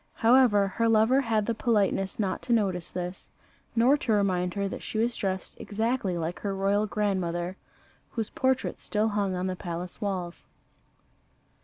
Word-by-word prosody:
However, 230 -4 +5
her 230 +4 0
lover 225 +5 +4
had 225 -4 +1
the 230 - 0
politeness 205 -4 +1
not 195 -3 -1
to 240 - 0
notice 190 -6 0
this, 180 +1 -6 0.5
nor 240 +5 +5
to 255 - -2
remind 185 -3 +1
her 200 0 0
that - - -6
she - - -5
was 230 +2 +1
dressed 190 -2 -3
exactly 220 -3 -1
like 165 +1 -3
her 200 -1 -2
royal 200 +2 +1
grandmother, 185 -4 -1 0.5
whose 225 -2 -3
portrait 260 -1 0
still 215 +1 0
hung 200 -3 0
on 180 +1 -2
the 185 -1 -1
palace 175 +2 -6
walls. 185 -4 -4
200 Hz, 160 wpm, -28 LUFS, 185-225 Hz, 0.5 s, However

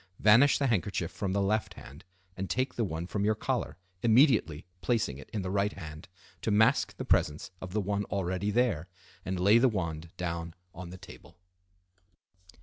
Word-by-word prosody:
Vanish 115 +7 +6
the 140 - 0
handkerchief 100 -7 0
from 100 -3 -3
the 100 +1 +1
left 110 +2 0
hand, 70 +8 -12 0.3
and 95 0 -4
take 130 +2 0
the 120 - -1
one 80 -4 -3
from 100 +3 -2
your 110 +1 +2
collar, 105 - -2 0.2
immediately 115 - +3 0.2
placing 110 - 0
it 70 - -12
in 105 -3 -3
the 90 - -3
right 100 +1 +1
hand 80 -3 -9 0.3
to - - -2
mask 110 +5 +3
the - - -5
presence 75 +4 +1
of 95 - -7
the 105 - +1
one 100 +1 -1
already 95 0 -2
there, 105 -8 +1 0.4
and 95 -1 -3
lay 100 +5 +5
the 130 +1 +4
wand 85 -6 -4
down 85 -2 -4 0.2
on 85 0 -8
the 90 - -9
table. 95 - -14
100 Hz, 180 wpm, -30 LUFS, 85-110 Hz, 0.4 s, Vanish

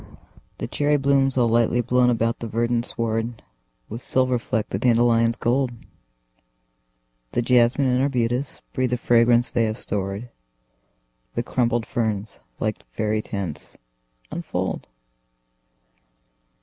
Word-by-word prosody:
The - - -4
cherry 145 0 +1
blooms, 135 -1 +2
all 120 -2 +4
lightly 115 +1 +2
blown 125 +1 +3
about 115 -1 0
the 115 - -5
verdant 115 +2 0
sward, 115 0 -2 0.4
With 115 +3 -7
silver 130 -1 +1
fleck 115 -2 -2
the - - -2
dandelion's 115 -1 +3
gold; 125 +2 0 1.6
The 120 - +1
jasmine 125 +3 +3
and 125 0 +2
arbutus 125 -1 -1
breathe 130 -1 0
the 125 - 0
fragrance 120 0 +3
they 115 -2 +2
have 110 0 -2
stored; 100 +3 -4 1.0
The 120 - 0
crumpled 120 -2 0
ferns, 110 -3 -2 0.2
like 110 -1 -2
faery 110 0 -1
tents, 95 -9 -6 0.5
unfold. - - -3
120 Hz, 120 wpm, -23 LUFS, 115-125 Hz, 1.6 s, all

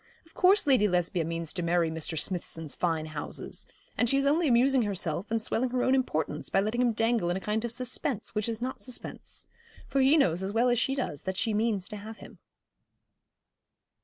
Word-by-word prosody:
Of 325 - -23
course 385 +3 +4
Lady 255 -7 +4
Lesbia 180 -2 +1
means 165 0 -4
to 180 - -3
marry 170 -1 +1
Mr. 160 0 -3
Smithson's 165 -2 -3
fine 165 -3 -1
houses; 155 -2 -5 0.3
and 240 - +2
she 275 - +3
is 275 - +1
only 310 +4 +3
amusing 255 +1 +4
herself 195 -3 -2
and 225 +1 +1
swelling 240 +3 0
her 250 0 0
own 260 - +3
importance 160 - -1
by - - +2
letting 215 +5 0
him 245 -1 +3
dangle 225 -4 +1
in 175 - 0
a - - -3
kind 210 +3 -2
of 235 - -3
suspense 250 -1 -2
which 210 +1 -1
is 230 +1 -3
not 260 +1 -4
suspense; 255 -2 -6 0.4
for 275 - +1
he 275 +4 +6
knows 180 - +2
as 190 +1 -2
well 235 +3 +3
as 240 -1 +2
she 270 +1 +1
does 245 - -3
that 190 0 -4
she 220 +2 0
means 210 -3 0
to 210 - -6
have 215 +2 -9
him.' - - -13
220 Hz, 210 wpm, -29 LUFS, 175-250 Hz, 0.4 s, he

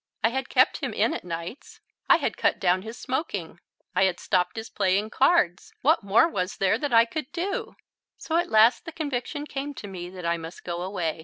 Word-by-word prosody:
I 225 - +5
had 265 +3 -3
kept - - +4
him - - -4
in - - +1
at - - -5
nights. 170 +7 -7 0.3
I - - +9
had - - -2
cut - - +1
down 185 0 +2
his 225 +4 -8
smoking. 200 - -4 0.4
I 190 - +4
had 185 -2 0
stopped 180 0 0
his 220 0 -5
playing 200 +2 0
cards. 265 - +2
What 300 -1 +4
more 210 +9 +5
was 185 - -3
there 195 +3 +2
that 290 0 -2
I 230 0 +6
could 300 +2 -5
do? 365 +3 -3 0.4
So 325 - -1
at 345 - 0
last 220 +6 +5
the 330 - -6
conviction 290 -1 -3
came 285 0 -5
to - - -8
me 180 -2 -7
that 180 -1 -9
I 170 0 +1
must 165 +1 -9
go 175 0 -4
away. 180 -4 -2
215 Hz, 215 wpm, -26 LUFS, 180-280 Hz, 0.4 s, I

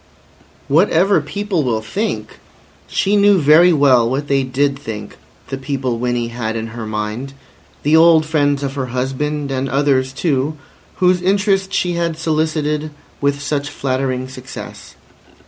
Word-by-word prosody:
Whatever 175 +3 +3
people 190 +2 -2
will 115 -4 -1
think? 205 - -4 0.5
She 200 +1 +1
knew 205 -1 +5
very 160 +4 +6
well 130 -7 +4
what 140 +3 -2
they 140 -1 +2
did 135 +1 0
think, 105 -5 -7 0.3
the 135 - -4
people 130 -3 -2
Winnie 120 -1 -1
had 115 -2 -4
in 115 0 -4
her 115 -1 -7
mind—the 125 +7 -4
old 160 -1 +6
friends 145 -2 +1
of 135 -1 -3
her 135 -2 -3
husband, 135 +3 -2
and 135 0 -2
others 135 -1 +1
too, 140 +1 -1 0.4
whose 180 -1 +2
interest 195 0 +1
she 180 -2 0
had 170 -2 -1
solicited 155 -1 -1 0.3
with 140 0 0
such 145 0 -2
flattering 130 -2 -2
success. 130 0 -10
140 Hz, 140 wpm, -18 LUFS, 130-160 Hz, 0.5 s, very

